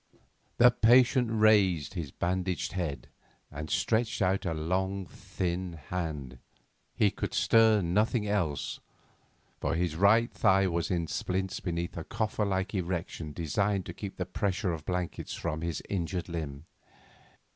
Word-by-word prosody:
The 125 +1 +7
patient 120 +1 +5
raised 105 -8 +3
his 85 -6 -4
bandaged 90 +3 -2
head 80 -9 -3 0.4
and 75 +1 -6
stretched 110 +1 +1
out 95 -1 +1
a 85 - 0
long 95 +4 -1
thin 90 0 -4
hand; 75 -6 -5 0.6
he - - +3
could - - -4
stir 110 -3 +5
nothing 105 +5 +1
else, 90 -9 -1 0.8
for - - -1
his 85 -2 -1
right 110 +6 +4
thigh 95 0 +4
was 85 -2 -1
in 85 -2 0
splints 95 +3 -2
beneath 85 -1 -3
a 80 - -4
coffer 110 +2 -1
like 95 +1 -1
erection 85 -4 -3
designed 95 +5 -1
to 90 - -6
keep 100 +2 -7
the 90 - -2
pressure 95 0 -1
of 80 - -5
the - - -3
blankets 90 -1 -3
from 75 +1 -3
his 85 -3 -3
injured 90 -2 -2
limb. 80 -4 -5
90 Hz, 145 wpm, -29 LUFS, 85-100 Hz, 0.8 s, The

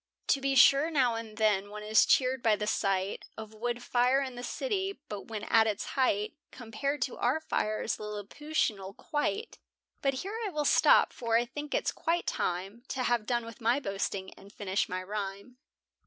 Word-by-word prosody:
To 275 - +3
be 275 0 +1
sure, 275 +4 +6
now 260 -7 +2
and 225 -2 -6
then, 205 -3 +2
one 210 0 -7
is 215 +1 +4
cheered 260 -1 +3
by 220 -2 +4
the 210 - -3
sight 195 -2 0
Of 220 -1 -8
wood 240 +2 -3
fire 250 +3 +3
in 265 -2 -3
the 245 - -7
city, 395 - -2
but 205 -2 -6
when 215 -2 -5
at 225 -1 +4
its 210 -2 -2
height 215 -6 +1 0.2
Compared 245 +3 -3
to 255 - -5
our 250 +6 +1
fires, 215 -7 -1
Lilliputianal 210 -1 -3
quite. 405 +9 -2 0.4
But 275 -1 +1
here 425 +3 -4
I 425 - -1
will 300 -4 -2
stop, - - +5
for 230 -2 +1
I 240 - +1
think 290 +4 -5
it - - 0
quite 340 +1 -1
time 190 +6 -2
To 255 - -2
have 240 -4 +1
done 240 -2 0
with 230 0 -11
my 235 +4 +3
boasting, 195 -4 -3
and 200 - -16
finish 200 -1 -1
my 185 0 -3
rhyme. 200 +4 -5
230 Hz, 185 wpm, -30 LUFS, 210-270 Hz, 0.4 s, sure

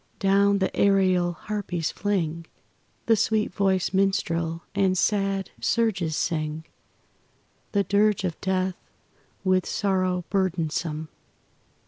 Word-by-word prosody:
Down 200 +1 +3
the 190 - -1
aerial 185 -3 +3
harpies 180 -4 -3
fling 170 -5 -2 0.6
The 225 - +4
sweet 215 -1 0
voiced 190 -1 +1
minstrel 170 -4 0
and 190 -2 +2
sad 195 -1 0
surges 190 -9 0
sing 155 -2 -2 1.1
The 200 -1 +3
dirge 205 +1 +2
of 175 -4 -3
death 185 -1 0 0.7
with 185 -1 +2
sorrow 185 -3 0
burdensome. 165 -4 -1
190 Hz, 100 wpm, -25 LUFS, 170-200 Hz, 1.1 s, The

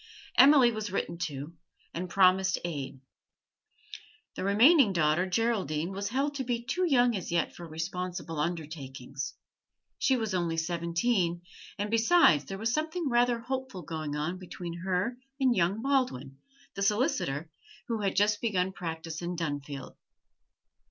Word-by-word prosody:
Emily 265 -2 +7
was 215 -3 -4
written 170 -3 -3
to, 145 +3 -7 0.4
and 180 +2 -4
promised 190 +1 +4
aid. 140 -5 -5 1.3
The - - -4
remaining 225 - +5
daughter, 160 +2 +2
Geraldine, 185 -6 0
was 200 +1 -3
held 275 +5 0
to 275 -2 -3
be 240 -1 -2
too 360 +9 0
young 245 -5 +4
as 185 -4 -4
yet 170 -1 0
for 170 - -9
responsible 170 0 -4
undertakings; 145 -4 -4 0.6
she 265 - +3
was 220 -4 -2
only 170 -3 0
seventeen, 170 +2 0 0.3
and, 205 +1 -3
besides, 230 - +5
there 195 - -6
was 225 +3 -1
something 315 +1 -1
rather 240 -1 +2
hopeful 260 -6 -4
going 155 -2 -4
on 160 +5 -2
between 175 -2 -7
her 190 +6 -1 0.2
and 260 -3 +3
young 190 +5 +1
Baldwin, 245 - 0 0.3
the 200 - -6
solicitor, 195 - 0 0.4
who 230 -3 -2
had 195 -2 0
just 205 +1 +2
begun 190 -5 0
practice 165 -2 -5
in 175 +1 -3
Dunfield. 145 -4 -5
185 Hz, 140 wpm, -29 LUFS, 165-235 Hz, 1.3 s, Emily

